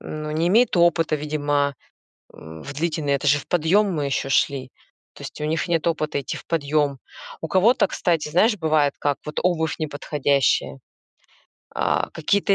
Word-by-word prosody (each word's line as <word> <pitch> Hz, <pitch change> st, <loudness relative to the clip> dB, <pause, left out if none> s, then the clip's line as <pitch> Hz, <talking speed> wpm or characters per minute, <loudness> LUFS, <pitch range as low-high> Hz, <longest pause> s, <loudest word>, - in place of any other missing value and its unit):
ну, 155 Hz, 0 st, -6 dB
не 165 Hz, +3 st, +1 dB
имеют 225 Hz, 0 st, +3 dB
опыта, 170 Hz, -2 st, +3 dB
видимо, 145 Hz, -1 st, -1 dB, 0.6 s
м, 80 Hz, 0 st, -11 dB
в 140 Hz, -, -7 dB
длительный 155 Hz, -1 st, -1 dB
это 140 Hz, +1 st, -1 dB
же 145 Hz, +1 st, +4 dB
в -, -, -13 dB
подъём 180 Hz, +5 st, +2 dB
мы 150 Hz, -3 st, -1 dB
ещё 135 Hz, 0 st, -2 dB
шли, 135 Hz, -1 st, 0 dB, 0.4 s
то -, -, -14 dB
есть -, -, -8 dB
у -, -, -1 dB
них 160 Hz, +3 st, -1 dB
нет 165 Hz, -2 st, 0 dB
опыта 155 Hz, -3 st, -1 dB
идти 130 Hz, -, -5 dB
в -, -, -13 dB
подъём. 145 Hz, -3 st, 0 dB, 0.4 s
У 160 Hz, -, -3 dB
кого-то, 200 Hz, +3 st, +3 dB
кстати, 165 Hz, -4 st, -1 dB
знаешь, 210 Hz, +7 st, +3 dB
бывает 155 Hz, -4 st, +2 dB
как: 145 Hz, -1 st, 0 dB
вот 150 Hz, -, -3 dB
обувь 160 Hz, -3 st, 0 dB
неподходящая, 145 Hz, -, 0 dB, 1.0 s
а, -, -, 0 dB
какие-то 195 Hz, +5 st, +1 dB
155 Hz, 165 wpm, -23 LUFS, 145-170 Hz, 1.0 s, же